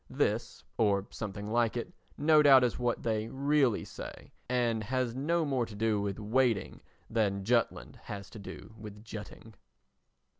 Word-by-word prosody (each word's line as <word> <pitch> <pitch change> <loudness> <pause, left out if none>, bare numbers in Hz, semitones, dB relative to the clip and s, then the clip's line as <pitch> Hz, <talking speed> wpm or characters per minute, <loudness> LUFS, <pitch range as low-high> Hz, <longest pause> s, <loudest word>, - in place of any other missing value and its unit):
This, - - -1 0.2
or 100 -3 +3
something 105 -1 -5
like 120 0 +2
it, 145 +9 -5 0.2
no 155 +1 +5
doubt 135 -3 +8
is 125 -1 0
what 120 -1 -1
they 110 -1 0
really 140 -2 +2
say - - -9 0.2
and 120 -3 +1
has 125 0 -1
no 160 +6 0
more 130 -5 0
to 105 - -10
do 110 -1 +1
with 100 -1 -2
waiting 115 0 0 0.3
than 100 -4 0
Jutland 120 +1 0
has 100 -1 -6
to 110 - -9
do 100 +2 -9
with 105 -1 -10
jutting. 110 0 -9
115 Hz, 155 wpm, -31 LUFS, 105-130 Hz, 0.3 s, doubt